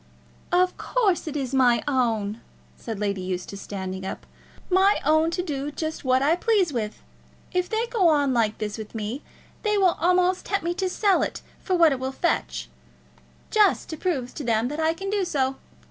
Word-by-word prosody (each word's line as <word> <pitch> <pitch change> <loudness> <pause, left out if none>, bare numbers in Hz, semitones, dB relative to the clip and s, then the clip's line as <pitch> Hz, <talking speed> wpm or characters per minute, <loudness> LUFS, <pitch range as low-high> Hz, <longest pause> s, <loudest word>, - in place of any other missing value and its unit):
"Of 365 +1 +2
course 410 -10 +1
it 305 -1 -3
is 270 -2 -3
my 245 -3 +4
own," 230 -5 0 0.3
said 225 -4 -6
Lady 200 -2 -1
Eustace, 185 +2 -5
standing 190 -1 -5
up, 190 - -6 0.4
"my 385 +2 +4
own 315 +2 +4
to 355 +2 -2
do 290 -4 -3
just 315 +1 -4
what 260 0 +3
I 310 +4 +4
please 380 -4 +2
with. 215 -3 -4 0.5
If 360 0 0
they 445 +1 0
go 455 -7 +2
on 290 -4 +3
like 225 -3 +1
this 215 0 -4
with 215 +1 -8
me, 220 +6 -4 0.4
they 420 -1 +1
will 375 -3 +4
almost 360 +1 +2
tempt 400 - 0
me 345 - 0
to 375 +1 -1
sell 395 0 +2
it - - -3 0.2
for 375 - 0
what 335 -3 +6
it 270 - -1
will 260 +1 -2
fetch, 340 +5 -1 0.8
just 420 -4 +3
to 315 - -4
prove 280 -9 -2
to 300 - -6
them 230 0 +1
that 295 +2 -5
I 320 +1 +2
can 390 +3 -4
do 410 -2 +1
so. 270 -6 0
295 Hz, 190 wpm, -25 LUFS, 235-365 Hz, 0.8 s, what